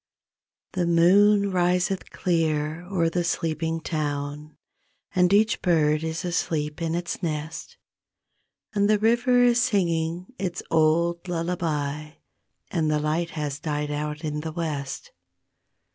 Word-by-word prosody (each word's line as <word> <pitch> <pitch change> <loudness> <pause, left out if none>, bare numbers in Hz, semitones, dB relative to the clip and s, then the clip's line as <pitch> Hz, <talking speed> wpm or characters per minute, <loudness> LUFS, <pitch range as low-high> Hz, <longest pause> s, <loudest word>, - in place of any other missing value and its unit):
C 185 - -1
he 175 - +1
moon 200 +4 +5
riseth 180 +1 +1
clear 160 -1 -1
o'er 180 -4 +1
the 175 +1 0
sleeping 165 -1 -1
town 150 -1 -4 0.6
And 180 -1 +3
each 210 +1 +3
bird 155 -3 +2
is 160 +2 -3
asleep 160 -3 -2
in 165 0 -1
its 175 +1 -3
nest, 155 -2 -4 1.0
And 205 0 +2
the 215 - +5
river 240 +3 +3
is 245 0 +4
singing 175 -4 0
its 180 -3 -3
old 170 +2 +2
lullaby 155 -4 -2 0.6
And 160 -4 0
the 155 - +2
light 155 +3 -1
has 145 -1 -3
died 150 -1 -2
out 150 +1 -3
in 150 -1 -2
the 160 +1 -5
West. 155 - -4
165 Hz, 130 wpm, -25 LUFS, 155-180 Hz, 1.0 s, moon